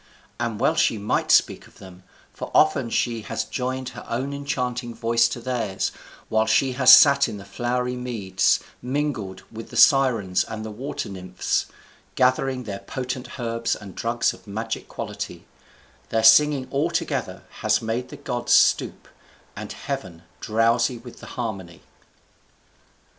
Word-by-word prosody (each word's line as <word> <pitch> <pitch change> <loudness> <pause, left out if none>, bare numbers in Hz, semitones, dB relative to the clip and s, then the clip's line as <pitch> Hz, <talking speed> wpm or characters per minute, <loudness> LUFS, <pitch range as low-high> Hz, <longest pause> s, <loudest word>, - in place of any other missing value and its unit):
And 115 -3 -2
well - - +3
she 115 - +2
might 105 +1 -1
speak - - +3
of - - -22
them, 95 -1 -13 0.3
for - - -7
often 140 -6 +3
she 115 -1 -1
has 110 - -3
joined 130 +2 -3
her - - -10
own 130 +4 -2
enchanting 125 -4 -3
voice 115 0 +2
to 120 - -5
theirs, 115 -6 -2 0.4
while 110 0 +1
she 130 +4 +3
has 130 0 +6
sat 140 -2 +7
in 105 - -6
the 100 - -11
flowery 125 +4 -2
meads, 110 -7 0 0.2
mingled 125 -8 -3
with 115 0 -9
the - - -7
Sirens 120 -10 +4
and 110 0 -7
the 110 - -6
Water 125 +7 -5
Nymphs, 90 -2 -2 0.5
gathering 130 0 +1
their 100 -3 -6
potent 125 +4 -6
herbs 115 -1 -1
and 100 -3 -11
drugs 115 +1 0
of - - -17
magic 110 +3 -4
quality: - - -6 0.6
their 110 0 0
singing 130 +4 +6
altogether 165 +5 -2 0.2
has - - +2
made 115 +3 -3
the 145 - -9
gods 125 -4 -1
stoop, - - +3 0.5
and - - -7
"heaven 85 -2 -6 0.2
drowsy 115 +3 +2
with 120 +1 -12
the - - -11
harmony." 95 -8 -5
120 Hz, 150 wpm, -23 LUFS, 110-130 Hz, 0.6 s, sat